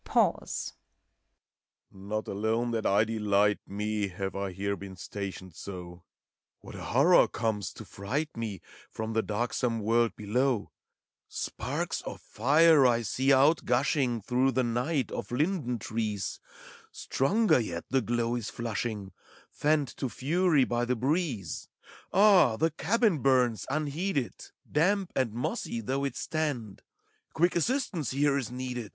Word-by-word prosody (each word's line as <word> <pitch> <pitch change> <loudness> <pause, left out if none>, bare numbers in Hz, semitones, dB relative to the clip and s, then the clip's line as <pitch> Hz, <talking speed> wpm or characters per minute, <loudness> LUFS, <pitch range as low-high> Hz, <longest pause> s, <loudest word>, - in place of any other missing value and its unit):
Pause. - - 0 1.2
Not 100 +2 -5
alone 110 +4 0
that 115 -2 0
I 100 +2 +4
delight 105 -2 +2
me. 105 +1 -2
Have 95 +1 -5
I 100 -1 -2
here 100 +2 -2
been 95 -1 -9
stationed 95 -1 -6
so: 90 0 -8 0.3
— - - -62
What - - -11
a - - -8
horror 150 +8 +5
comes, 110 -4 -2
to - - -10
fright 140 +11 -3
me. 110 -5 -4 0.3
From 110 0 -4
the 110 - +2
darksome 115 +2 -1
world 115 +2 +2
below! 120 +2 0 0.6
Sparks - - -3
of - - -7
fire 150 +5 +4
I 120 -1 +2
see 130 +5 -2
outgushing 135 - +3
Through 130 +3 +2
the 130 - +2
night 125 +3 -1
of 100 - -5
linden 145 -2 0
trees; 105 -3 -3 0.5
Stronger 200 - +2
yet 85 -7 -4
the 135 0 +3
glow 120 +1 0
is 120 -3 -3
flushing, 110 -4 -4 0.4
Fanned 150 -3 +1
to 130 - -2
fury 155 +3 +2
by 120 -1 0
the 125 +1 0
breeze. 130 - -1 0.4
A.h! 190 - +6
the 160 0 +2
cabin 205 +2 +1
burns, 125 -5 +2
unheeded. 150 -1 -1 0.4
Damp 190 +4 +2
and 130 -4 +1
mossy 120 0 -3
though 135 +5 -2
it 135 -3 -3
stand: 140 -12 -3 0.5
Quick 175 +2 +2
assistance 180 - 0
here 140 +1 +2
is 135 -6 -2
needed, 125 -1 -4
A. - - -18
120 Hz, 140 wpm, -29 LUFS, 105-145 Hz, 1.2 s, A.h